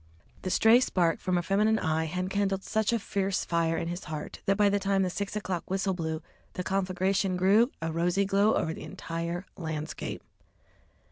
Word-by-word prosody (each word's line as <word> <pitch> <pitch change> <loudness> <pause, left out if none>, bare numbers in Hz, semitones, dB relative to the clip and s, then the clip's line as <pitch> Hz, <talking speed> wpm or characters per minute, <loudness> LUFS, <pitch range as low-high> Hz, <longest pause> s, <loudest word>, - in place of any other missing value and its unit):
The 185 - -3
stray 225 +5 +6
spark 175 -9 +1
from 185 -1 0
a 175 - 0
feminine 210 +5 +2
eye 160 -3 0
had 180 +4 -3
kindled 195 -1 0
such 220 0 0
a 235 - +2
fierce 195 -2 -1
fire 165 -1 +1
in 165 - -2
his 175 +1 -5
heart 155 -1 -6
that 195 0 +3
by 205 -1 +5
the 200 0 +2
time 195 -1 +1
the 185 - -1
six 200 +3 -4
o'clock 190 -5 -3
whistle 190 +1 0
blew 160 -2 -3 0.3
the 180 - -3
conflagration 190 0 0
threw 205 +6 +4
a 165 - -1
rosy 175 +4 +1
glow 200 +2 +3
over 160 - 0
the - - -9
entire 170 +2 -4
landscape. 160 -3 -5
185 Hz, 190 wpm, -29 LUFS, 170-200 Hz, 0.3 s, stray